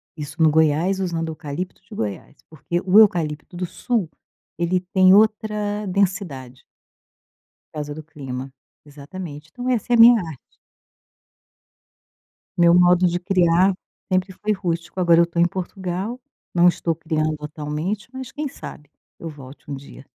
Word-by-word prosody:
isso 150 +1 -6
no 160 - +6
Goiás 160 +5 +2
usando 170 -3 -2
eucalipto 160 +3 -6
de 185 - -15
Goiás, 105 +5 -5
porque 165 +2 -3
o 190 +2 +4
eucalipto 165 -6 +2
do 180 +1 -3
Sul, 215 0 -2 0.5
ele 175 +2 +1
tem 185 -1 +6
outra 210 0 +2
densidade. 180 -10 -2 1.1
Por - - -9
causa 150 0 -5
do 155 - -7
clima, 135 -4 -7 0.3
exatamente, 150 +1 -9
então 250 0 -6
essa 245 -1 0
é - - +6
a 230 - +2
minha 235 0 +9
arte. 160 -7 -11 2.0
Meu 170 -1 +6
modo 180 0 +5
de 175 0 +1
criar 185 0 +3 0.4
sempre 185 +1 +1
foi 210 +3 -2
rústico. 175 -2 -4
Agora 170 -1 +5
eu 170 - +6
tô 170 0 -4
em 170 - +6
Portugal, 190 +4 -4 0.4
não 175 0 +5
estou 170 -1 -1
criando 155 -1 -1
atualmente, 150 +7 -4
mas 260 -2 -7
quem 300 0 -4
sabe 150 - -10 0.3
eu 170 - -7
volte 140 -2 -13
um 140 - -3
dia. 135 0 -12
175 Hz, 150 wpm, -22 LUFS, 155-190 Hz, 2.0 s, minha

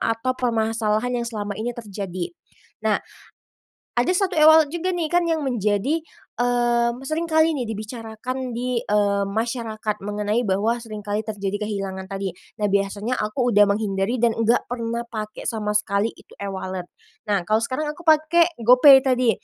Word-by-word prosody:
atau 225 +3 0
permasalahan 225 -1 0
yang 235 - -3
selama 205 -3 -4
ini 240 +1 -3
terjadi. 190 -5 -5 0.5
Nah 215 -1 +3 1.0
ada 245 - +2
satu 385 0 0
e-wallet 315 0 +7
juga 355 +2 -1
nih 335 -3 -1
kan 350 0 +3
yang 320 -2 0
menjadi 240 +6 0 0.4
mmm, 240 0 +1
sering 325 +3 -1
kali 315 +1 +4
nih 250 -5 -2
dibicarakan 225 +4 -5
di 245 0 -1
eee, 205 -1 +1
masyarakat 220 0 -2
mengenai 210 +3 -1
bahwa 205 +4 +1
sering 215 -2 -7
kali 205 +1 -1
terjadi 205 0 -3
kehilangan 190 -2 -4
tadi. 195 -2 -3 0.2
Nah 210 - +1
biasanya 200 +4 0
aku 240 +4 0
udah 205 0 +7
menghindari 205 +2 0
dan 230 -2 +3
enggak 230 +1 +2
pernah 235 0 -3
pakai 215 -2 -6
sama 210 -2 -2
sekali 205 +1 0
itu - - -18
e-wallet. 190 -2 -4 0.4
Nah 200 -3 +2
kalau 215 +1 +2
sekarang 260 +6 -2
aku 345 - -13
pakai 320 +2 +4
GoPay 255 +4 +8
tadi, 250 -2 +3
225 Hz, 155 wpm, -23 LUFS, 205-250 Hz, 1.0 s, GoPay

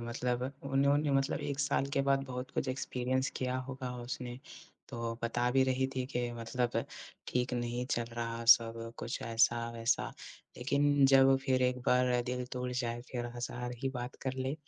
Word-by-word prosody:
मतलब 120 +1 -2 0.2
उन्होंने 140 +2 +2
मतलब 135 0 +1
1 140 -1 -3
साल 135 - +1
के - - +3
बाद 135 0 +3
बहुत 125 -1 -5
कुछ 130 - -1
एक्सपीरियंस 130 0 -1
किया 130 0 -1
होगा 130 -1 -4
उसने, 120 0 -5 0.5
तो 115 -2 -3
बता 120 +1 +1
भी 135 +1 +4
रही 130 0 +1
थी 130 -1 -1
कि 120 -2 -2
मतलब 120 +1 -1 0.4
ठीक 125 0 0
नहीं 120 +1 -2
चल 120 - +1
रहा 115 0 -3
सब, 115 0 +5
कुछ 115 - -4
ऐसा-वैसा। 115 0 +1 0.5
लेकिन 140 +2 +3
जब 135 0 +6
फिर 130 -2 +2
एक 125 0 +2
बार 125 -1 +3
दिल 125 0 -2
टूट 125 0 -2
जाए, 120 0 -2
फिर 120 -1 -3
हज़ार 120 +1 -4
ही 135 - +1
बात 125 +1 -5
कर 130 - -1
ले, 130 +2 -1
125 Hz, 170 wpm, -32 LUFS, 120-130 Hz, 0.5 s, जब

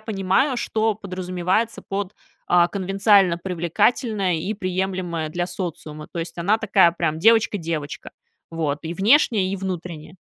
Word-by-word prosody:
понимаю, 220 +5 0
что 220 -1 0
подразумевается 185 +2 -2
под, 195 0 -4 0.4
э, 175 0 +4
"конвенциально 195 -2 +3
привлекательная" 190 +3 0
и 175 +6 -2
"приемлемая 185 -4 -3
для 175 +2 -2
социума", 160 -4 -6
то 170 - -5
есть, 165 0 -5
она 200 +6 +1
такая 190 -6 +4
прям 160 -2 -2
девочка 225 +2 +4
девочка, 160 -4 -5 0.4
вот, 155 -3 -2
и 165 +1 -4
внешне 205 - +3
и 195 - -2
внутренне. 175 -3 -6
185 Hz, 135 wpm, -22 LUFS, 170-205 Hz, 0.4 s, э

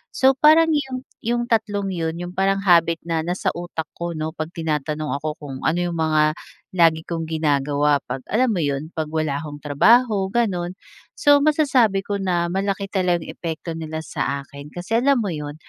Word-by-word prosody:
So 265 -1 +5
parang 310 +4 +5
yung 265 -4 -1 0.2
yung 240 +1 -1
tatlong 210 -4 0
yun 165 -2 -2
yung 175 +1 -6
parang 195 +1 0
habit 170 -3 +4
na 165 -1 -1
nasa 175 +3 -1
utak 175 -2 -5 0.2
ko 170 0 -3
'no, 155 0 -3
pag 155 -1 -5
tinatanong 155 -1 -2
ako 155 0 -3
kung 140 -3 -8
ano 155 - +2
yung 175 -1 -2
mga 155 -1 +3 0.4
lagi 165 -2 +4
kong 165 -1 -3
ginagawa, 145 -2 +1
pag - - -5
alam 240 +3 +3
mo 175 - -1
yun, 140 +1 -2
pag 160 -1 -2
wala 155 -3 -1
akong 145 -1 -8
trabaho, 205 - +4
ganun. 185 -7 0 0.5
So 290 0 +6
masasabi 270 -10 +3
ko 205 - -3
na 175 -3 0
malaki 195 +2 -2
talaga 180 -4 0
yung - - -5
epekto 165 0 -5
nila 160 -1 -5
sa 140 -2 -3
akin, 140 +1 -12
kasi 180 +6 -3
alam 270 +2 +3
mo 205 -5 -1
yun, 150 -1 -5
170 Hz, 185 wpm, -22 LUFS, 155-205 Hz, 0.5 s, So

